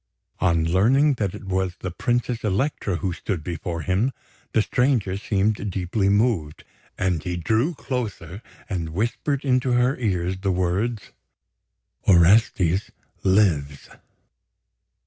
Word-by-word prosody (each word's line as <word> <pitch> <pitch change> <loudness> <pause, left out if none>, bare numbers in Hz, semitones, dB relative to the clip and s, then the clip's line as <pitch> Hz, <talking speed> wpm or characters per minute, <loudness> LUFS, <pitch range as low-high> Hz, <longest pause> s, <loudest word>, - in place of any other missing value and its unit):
On 85 -3 +2
learning 125 - +3
that 100 -3 -1
it - - -9
was 95 -1 -1
the 95 - -5
Princess 120 +4 -1
Elektra 105 -1 -1
who 90 +1 -2
stood 90 -2 -4
before 85 0 -4
him, 100 - +1 0.4
the 110 - +3
stranger 125 -8 +1
seemed 105 0 0
deeply 95 +2 0
moved; 100 -8 +1 0.3
and 90 -5 0
he 90 +2 -3
drew 110 - 0
closer 105 - -5 0.3
and 85 -6 -3
whispered 130 +7 -1
into 130 -1 +2
her 125 +2 +3
ears 95 -5 -1
the 95 0 0
words: 95 +6 -1 1.0
"Orestes 95 0 +4 0.3
lives!" 85 -8 +1
95 Hz, 120 wpm, -23 LUFS, 90-115 Hz, 1.0 s, Orestes